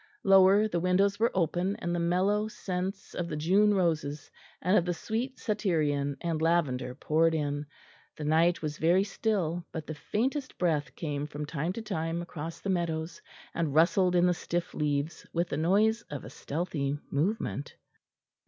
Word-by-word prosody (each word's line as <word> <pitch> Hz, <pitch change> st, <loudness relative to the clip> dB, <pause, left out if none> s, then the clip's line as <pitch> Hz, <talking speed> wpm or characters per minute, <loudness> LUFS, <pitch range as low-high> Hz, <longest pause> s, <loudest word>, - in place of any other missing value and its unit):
Lower, 195 Hz, +2 st, +6 dB
the 175 Hz, -5 st, -1 dB
windows 195 Hz, +3 st, +2 dB
were 230 Hz, +1 st, +4 dB
open, 180 Hz, +2 st, +1 dB
and 175 Hz, 0 st, -3 dB
the 175 Hz, -, 0 dB
mellow 190 Hz, +5 st, +1 dB
scents 185 Hz, -2 st, -4 dB
of 175 Hz, -, -3 dB
the 160 Hz, -, -4 dB
June 195 Hz, +7 st, +3 dB
roses, 155 Hz, -5 st, -1 dB, 0.3 s
and 185 Hz, +4 st, +2 dB
of 180 Hz, -, +5 dB
the 175 Hz, 0 st, -1 dB
sweet 240 Hz, +8 st, -3 dB
satyrian 155 Hz, -, 0 dB
and 165 Hz, -2 st, -1 dB
lavender 145 Hz, -7 st, +1 dB
poured 160 Hz, +3 st, +2 dB
in; 145 Hz, -1 st, -2 dB, 0.5 s
the 155 Hz, -, -6 dB
night 160 Hz, +3 st, +3 dB
was 155 Hz, 0 st, -3 dB
very 175 Hz, +4 st, +4 dB
still, 185 Hz, -4 st, -1 dB
but 160 Hz, -2 st, -5 dB
the 155 Hz, -, -5 dB
faintest 260 Hz, -, -2 dB
breath 160 Hz, -4 st, 0 dB
came 145 Hz, -3 st, -3 dB
from 150 Hz, 0 st, -5 dB
time 155 Hz, +2 st, -2 dB
to 230 Hz, -, -6 dB
time 165 Hz, -5 st, -2 dB
across 165 Hz, -1 st, -7 dB
the -, -, -5 dB
meadows 170 Hz, -3 st, -2 dB, 0.3 s
and 160 Hz, -4 st, -1 dB
rustled 180 Hz, +3 st, +4 dB
in 175 Hz, 0 st, +5 dB
the 180 Hz, -, +4 dB
stiff 175 Hz, 0 st, -3 dB
leaves 150 Hz, +1 st, -2 dB
with 170 Hz, +1 st, 0 dB
the -, -, -2 dB
noise 210 Hz, +8 st, +3 dB
of 145 Hz, -2 st, -6 dB
a -, -, -9 dB
stealthy 145 Hz, -3 st, -2 dB
movement. 155 Hz, -1 st, -1 dB
170 Hz, 170 wpm, -29 LUFS, 155-190 Hz, 0.5 s, Lower